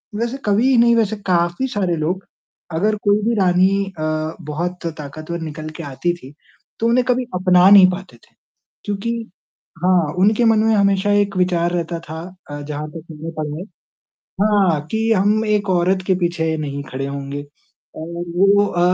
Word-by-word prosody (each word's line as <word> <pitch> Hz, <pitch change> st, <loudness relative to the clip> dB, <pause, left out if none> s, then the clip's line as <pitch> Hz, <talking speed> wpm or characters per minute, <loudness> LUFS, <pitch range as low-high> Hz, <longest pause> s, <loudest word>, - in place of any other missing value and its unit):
वैसे 235 Hz, +4 st, -2 dB
कवि 225 Hz, +6 st, +3 dB
नहीं 235 Hz, 0 st, +5 dB
वैसे 220 Hz, -2 st, +1 dB
काफ़ी 175 Hz, +6 st, +1 dB
सारे 190 Hz, -8 st, -1 dB
लोग 175 Hz, +5 st, -2 dB, 0.5 s
अगर 210 Hz, +6 st, +1 dB
कोई 205 Hz, 0 st, +3 dB
भी 235 Hz, -, +2 dB
रानी 190 Hz, +2 st, +3 dB, 0.2 s
अ, 155 Hz, +1 st, -2 dB
बहुत 170 Hz, +4 st, -4 dB
ताक़तवर 155 Hz, +3 st, -6 dB
निकल 155 Hz, -1 st, -6 dB
के -, -, -5 dB
आती 145 Hz, +5 st, -2 dB
थी, 145 Hz, -5 st, -12 dB, 0.5 s
तो 230 Hz, -, +1 dB
उन्हें 245 Hz, +2 st, +3 dB
कभी 255 Hz, 0 st, +1 dB
अपना 180 Hz, 0 st, +5 dB
नहीं 200 Hz, -2 st, +9 dB
पाते 185 Hz, +1 st, -8 dB
थे। -, -, -28 dB, 0.5 s
क्योंकि 205 Hz, +3 st, -2 dB, 0.7 s
हाँ 180 Hz, -5 st, +3 dB
उनके 215 Hz, +5 st, +3 dB
मन 225 Hz, -1 st, +4 dB
में 225 Hz, 0 st, +3 dB
हमेशा 200 Hz, 0 st, +2 dB
एक 200 Hz, -1 st, -1 dB
विचार 175 Hz, -2 st, +1 dB
रहता 170 Hz, -1 st, -2 dB
था 160 Hz, 0 st, -8 dB, 0.3 s
अ, 145 Hz, 0 st, -6 dB
जहाँ 150 Hz, +1 st, -5 dB
तक 160 Hz, +1 st, -9 dB
मैंने 160 Hz, +1 st, -7 dB
पढ़ा 150 Hz, 0 st, -3 dB
है 180 Hz, -, -6 dB, 0.8 s
हाँ 195 Hz, -7 st, +3 dB
कि 225 Hz, +1 st, 0 dB
हम 210 Hz, +2 st, +2 dB
एक 210 Hz, -1 st, 0 dB
औरत 185 Hz, +1 st, +2 dB
के 190 Hz, -, +3 dB
पीछे 165 Hz, -2 st, 0 dB
नहीं 140 Hz, -2 st, -4 dB
खड़े 135 Hz, +1 st, -3 dB
होंगे 140 Hz, 0 st, -5 dB, 0.5 s
और 170 Hz, +2 st, -5 dB
वो 200 Hz, +2 st, +4 dB
अ, 175 Hz, -, -2 dB
180 Hz, 170 wpm, -19 LUFS, 160-205 Hz, 0.8 s, नहीं